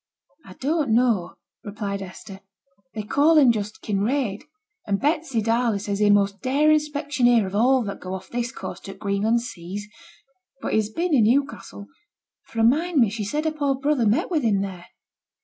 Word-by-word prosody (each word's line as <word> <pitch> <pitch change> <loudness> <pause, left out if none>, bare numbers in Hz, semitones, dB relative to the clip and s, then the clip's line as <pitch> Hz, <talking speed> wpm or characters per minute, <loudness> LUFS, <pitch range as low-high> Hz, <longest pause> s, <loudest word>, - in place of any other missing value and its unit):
'I 185 - -11
don't 280 - 0
know,' 230 -7 +1 0.3
replied 200 -1 -4
Hester; 190 +1 -10 0.6
'they 215 - -3
call 290 +9 +3
him 270 -5 +7
just 210 -1 -5
Kinraid; 215 +3 -1 0.4
and 200 -1 0
Betsy 290 -6 0
Darley 230 -1 +1
says 200 0 -3
he's 210 - +3
t' - - +5
most 200 -1 +2
daring 300 +4 +3
specksioneer 285 -6 +1
of 190 - -7
all 250 +4 +3
that 200 -2 -6
go 185 +1 -5
off 190 0 -9
this 240 0 -3
coast 190 -7 -8
to 195 - -7
t' - - -19
Greenland 210 +3 0
seas. 200 -2 -7 0.7
But - - -4
he's 215 -1 +1
been 335 +8 -2
in 235 -6 +5
Newcastle, 270 -4 -1 0.6
for 225 - -3
I - - +3
mind 315 +8 +2
me 230 -5 +4
she 215 0 -4
said 295 +10 -2
her 315 - +1
poor 285 -3 0
brother 270 -3 +1
met 220 - +1
with 320 -4 +1
him 210 -5 +1
there.' 185 -3 -6
230 Hz, 185 wpm, -23 LUFS, 200-280 Hz, 0.7 s, him